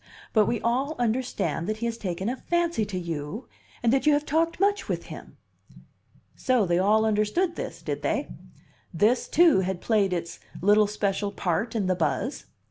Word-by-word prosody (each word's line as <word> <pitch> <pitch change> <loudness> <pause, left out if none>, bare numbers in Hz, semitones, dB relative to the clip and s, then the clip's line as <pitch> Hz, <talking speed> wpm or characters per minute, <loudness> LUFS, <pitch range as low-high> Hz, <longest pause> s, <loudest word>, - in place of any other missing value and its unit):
But 215 -2 +4
we 235 - 0
all 265 +6 0
understand 240 -7 -1
that 215 0 -2
he 235 - -3
has 230 -1 -1
taken 190 -3 -4
a 245 - -1
fancy 340 -5 0
to 200 -2 -5
you, 170 - -5 0.4
and 235 +1 +3
that 270 +2 +1
you 300 - +6
have 290 +1 +1
talked 330 +3 0
much 405 +2 +1
with - - -2
him." - - -12 1.0
So 250 -5 +2
they 175 0 +1
all 215 +3 +3
understood 220 - +1
this, - - -6
did - - -3
they? - - -1 0.6
This, 210 +8 +2
too, 335 - +5
had 190 -1 -2
played 205 -3 +1
its 170 -1 -4 0.2
little 205 +2 +4
special 205 -1 -1
part 200 +5 -2
in 210 -4 0
the 185 - +2
buzz? 165 -4 -2
215 Hz, 180 wpm, -26 LUFS, 190-260 Hz, 1.0 s, you